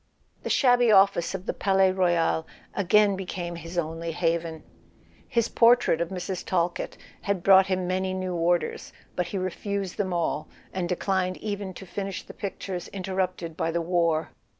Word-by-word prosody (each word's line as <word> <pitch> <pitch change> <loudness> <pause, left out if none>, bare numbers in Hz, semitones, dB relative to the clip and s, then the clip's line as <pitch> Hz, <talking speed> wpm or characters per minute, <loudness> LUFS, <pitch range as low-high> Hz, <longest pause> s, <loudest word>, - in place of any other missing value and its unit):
The - - -5
shabby 245 -3 +4
office 195 -3 +4
of 190 0 -6
the - - -1
Palais 190 -1 +3
Royal 175 -3 +1 0.3
again 200 +1 +4
became 180 -2 -5
his 170 +1 -8
only 165 0 -2
haven. 165 -1 -1 0.7
His 235 -1 +2
portrait 235 -9 +4
of 170 - -1
Mrs. 185 0 -4
Talkett 175 -1 -1 0.2
had 200 -3 -1
brought 190 0 +7
him 185 -1 0
many 185 +1 -1
new 185 -1 -3
orders; 175 +1 0 0.2
but 180 -1 -1
he 195 - -4
refused 190 +1 -3
them 190 -2 -1
all, 170 -3 -1 0.3
and 180 -2 -2
declined 185 0 0
even 200 -2 -4
to 190 - -9
finish 195 +1 -5
the - - -11
pictures 190 -2 -5
interrupted 185 -3 -3
by 165 - -1
the 170 +1 0
war. 170 -2 +1
185 Hz, 160 wpm, -26 LUFS, 170-195 Hz, 0.7 s, brought